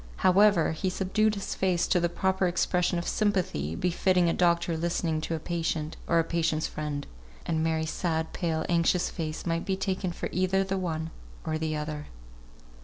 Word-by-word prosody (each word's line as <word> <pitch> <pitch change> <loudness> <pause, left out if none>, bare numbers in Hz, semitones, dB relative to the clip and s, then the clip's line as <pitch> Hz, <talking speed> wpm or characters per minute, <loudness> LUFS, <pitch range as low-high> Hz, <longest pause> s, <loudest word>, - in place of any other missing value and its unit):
However, 190 -2 +5
he 175 +4 -1
subdued 210 +4 +1
his 200 - -4
face 180 -2 +1
to 180 - +2
the 175 0 +1
proper 190 +1 +1
expression 180 0 +1
of 170 - -3
sympathy, 180 - 0
befitting 180 0 +2
a 165 - +2
doctor 170 -1 +2
listening 165 -1 -1
to 165 +1 -2
a - - -3
patient, 165 -1 -2
or 170 - +3
a 165 - +4
patient's 160 -1 0
friend 150 -2 -4 0.4
(and 160 -1 0
Mary's 160 -1 0
sad, 160 -2 -1
pale, 160 -2 -1
anxious 170 +1 +2
face 155 -2 -4
might 165 -1 0
be 190 -1 -1
taken 190 -1 -1
for - - -4
either 185 +1 +2
the 195 0 -2
one 160 -3 -3 0.3
or 155 0 -1
the 155 -1 -1
other). 150 0 -4
170 Hz, 180 wpm, -28 LUFS, 160-185 Hz, 0.4 s, However